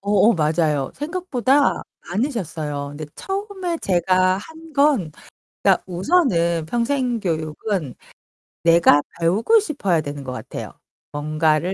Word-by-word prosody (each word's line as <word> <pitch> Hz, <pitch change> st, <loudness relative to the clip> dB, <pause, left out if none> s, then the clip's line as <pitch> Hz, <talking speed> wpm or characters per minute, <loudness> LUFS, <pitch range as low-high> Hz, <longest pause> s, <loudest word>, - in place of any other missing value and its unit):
어 200 Hz, -, -4 dB, 0.2 s
어 -, -, +4 dB
맞아요. 155 Hz, -3 st, +1 dB
생각보다 290 Hz, -4 st, +1 dB, 0.3 s
많으셨어요. 165 Hz, -, -3 dB
근데 150 Hz, +1 st, -7 dB
처음에 385 Hz, -3 st, -4 dB
제가 185 Hz, +1 st, +2 dB
한 320 Hz, +9 st, -12 dB
건 275 Hz, -, +3 dB, 0.5 s
그러니까 -, -, +4 dB
우선은 175 Hz, -, +1 dB
평생 240 Hz, -, 0 dB
교육은 160 Hz, -, -2 dB, 0.7 s
내가 165 Hz, -3 st, +6 dB, 0.2 s
배우고 210 Hz, -, +3 dB
싶어야 275 Hz, -, 0 dB
되는 145 Hz, -1 st, -6 dB
것 130 Hz, -, -6 dB
같아요. 125 Hz, -, -7 dB, 0.4 s
뭔가를 155 Hz, +4 st, 0 dB
185 Hz, 265 characters per minute, -21 LUFS, -, 0.7 s, 내가